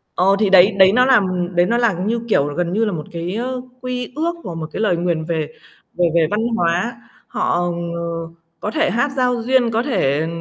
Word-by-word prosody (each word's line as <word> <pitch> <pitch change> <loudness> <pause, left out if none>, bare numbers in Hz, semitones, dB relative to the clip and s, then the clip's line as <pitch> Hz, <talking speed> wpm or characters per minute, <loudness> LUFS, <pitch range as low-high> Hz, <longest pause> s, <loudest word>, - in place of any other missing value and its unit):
Ờ, 195 +2 +3
thì 205 -3 +2
đấy 190 +2 +7
đấy 190 0 +7
nó 250 +2 +4
làm 250 -7 +4 0.3
đấy 175 +1 +4
nó 235 +1 +1
là, 235 -4 +3
như 210 +7 -2
kiểu, 145 -8 +2
là 145 - -6
gần 175 0 -2
như 225 +3 +1
là 210 - -1
một 155 -3 -4
cái, 170 +3 -4
ơ, 250 +2 -3 0.2
quy 250 -1 -4
ước 335 +2 0
hoặc 170 - -5
một 160 -1 -5
cái - - -4
lời 180 -5 +2
nguyền 170 -2 -1
về 160 -2 -2 0.5
về 175 - +1
về 165 -2 +4
văn 210 +1 0 0.2
hóa. 175 +7 0 0.3
Họ, - - -1 0.4
ờ, 170 - -4 0.6
có 210 - -3
thể 315 +3 +1
hát 270 +5 0
giao 250 -2 +1
duyên, 250 -1 +2
có 225 +1 0
thể, 160 - 0
200 Hz, 225 wpm, -19 LUFS, 170-240 Hz, 0.6 s, đấy